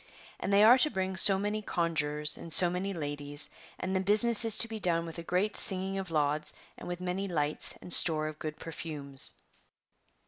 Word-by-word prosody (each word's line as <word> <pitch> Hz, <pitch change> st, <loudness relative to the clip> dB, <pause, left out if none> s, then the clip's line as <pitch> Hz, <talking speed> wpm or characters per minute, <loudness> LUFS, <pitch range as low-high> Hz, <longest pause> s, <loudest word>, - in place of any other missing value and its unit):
'' -, -, -22 dB
And 195 Hz, -, -4 dB
they 200 Hz, +1 st, +4 dB
are 240 Hz, +4 st, +6 dB
to 305 Hz, -, +4 dB
bring 190 Hz, -5 st, -4 dB
so 190 Hz, 0 st, +7 dB
many 210 Hz, +2 st, -3 dB
conjurors, 150 Hz, -5 st, -1 dB
and 165 Hz, -, -11 dB
so 175 Hz, +2 st, +4 dB
many 185 Hz, +2 st, -4 dB
ladies, 145 Hz, -3 st, -6 dB, 0.3 s
and 190 Hz, +1 st, -4 dB
the -, -, +1 dB
business 210 Hz, +4 st, +2 dB
is 225 Hz, -2 st, +2 dB
to 230 Hz, -, +4 dB
be 220 Hz, -1 st, -7 dB
done 170 Hz, -3 st, 0 dB
with 165 Hz, 0 st, -9 dB
a -, -, -7 dB
great 185 Hz, +5 st, -2 dB
singing 190 Hz, 0 st, +4 dB
of 190 Hz, -2 st, -6 dB
lauds, 150 Hz, -1 st, -2 dB, 0.2 s
and -, -, -11 dB
with 175 Hz, 0 st, -6 dB
many 180 Hz, +2 st, -4 dB
lights 150 Hz, -4 st, -2 dB
and 180 Hz, -, -5 dB
store 155 Hz, -2 st, +3 dB
of 155 Hz, 0 st, -9 dB
good 155 Hz, -1 st, -6 dB
perfumes. 150 Hz, -4 st, -4 dB
180 Hz, 205 wpm, -29 LUFS, 155-195 Hz, 0.3 s, so